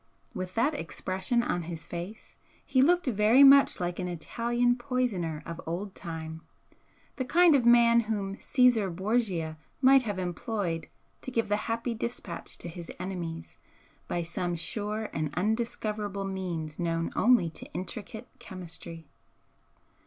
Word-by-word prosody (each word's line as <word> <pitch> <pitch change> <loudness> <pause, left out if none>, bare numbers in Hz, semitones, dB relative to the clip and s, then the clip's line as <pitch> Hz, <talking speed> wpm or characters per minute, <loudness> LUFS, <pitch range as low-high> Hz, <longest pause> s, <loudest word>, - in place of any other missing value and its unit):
With 185 0 -5
that 255 +7 +2
expression 235 -3 -1
on 175 - -1
his 165 -1 -7
face 175 +5 -7 0.3
he 260 - +3
looked 350 +6 +4
very 230 +2 +5
much 275 0 +7
like 175 -1 -2
an 180 - -2
Italian 240 +8 0
poisoner 240 - -2
of 170 0 -6
old 185 +4 -3
time, 160 -1 -6 0.8
the 260 - 0
kind 340 +5 +5
of 255 -4 +3
man 235 0 +7
whom 205 -4 -2
Caesar 245 -6 +3
Borgia 185 -4 -1 0.2
might 270 0 +6
have 205 -5 -3
employed 180 -1 -3 0.3
to - - -4
give 230 -4 -1
the 205 - +3
happy 230 +1 -1
dispatch 225 -6 -5
to - - -8
his 170 0 -8
enemies 170 -3 -5 0.5
by 175 - -1
some 175 +1 -2
sure 210 +6 -3
and 155 -2 -2
undiscoverable 210 -1 -1
means 175 -5 -4
known 165 -1 -1
only 230 -9 +4
to - - -11
intricate 215 +5 -6
chemistry. 170 -6 -7
200 Hz, 140 wpm, -29 LUFS, 170-235 Hz, 0.8 s, much